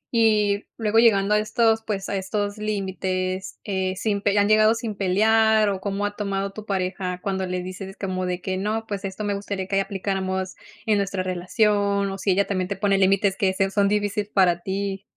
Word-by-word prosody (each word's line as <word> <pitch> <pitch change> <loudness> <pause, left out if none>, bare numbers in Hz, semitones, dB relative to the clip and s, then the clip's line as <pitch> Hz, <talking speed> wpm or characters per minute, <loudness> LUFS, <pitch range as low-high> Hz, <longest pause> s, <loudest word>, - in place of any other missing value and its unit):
y 210 -2 +3
luego 225 0 +2
llegando 210 -3 +4
a 210 - +4
estos, 225 +1 +2
pues, 200 -3 -4
a 200 - -2
estos 205 +2 -2
límites, 190 -2 -3
eh, 190 -2 -2
sin 200 0 -1
pe 205 -1 +1
¿y - - 0
han 205 - +4
llegado 215 +1 +5
sin 225 -2 -4
pelear 215 +3 +3
o 190 -1 -3
cómo 200 +1 -2
ha 205 0 -3
tomado 200 -1 -2
tu 215 0 -9
pareja 185 -1 -2
cuando 190 -1 -2
le 180 0 -3
dices 190 +1 -8
como 185 -2 -2
de 180 0 -2
que 185 0 -3
no, 215 +3 -2
pues, 200 -1 -4
esto 195 +2 -5
me 205 -1 -1
gustaría 200 -1 -4
que 195 - -2
ahí - - +4
aplicáramos 190 -1 -2 0.3
en 215 -2 +3
nuestra 195 -1 -1
relación, 200 +2 +1
o 195 - -5
si 200 - -1
ella 200 +2 +2
también 185 -2 -2
te 200 - -3
pone 195 0 +1
límites 195 +1 +3
que 195 -1 +1
sea 195 0 0
son 200 -1 +2
difícil 205 0 0
para 180 -3 +3
ti? 195 +1 -3
200 Hz, 210 wpm, -24 LUFS, 190-210 Hz, 0.3 s, llegado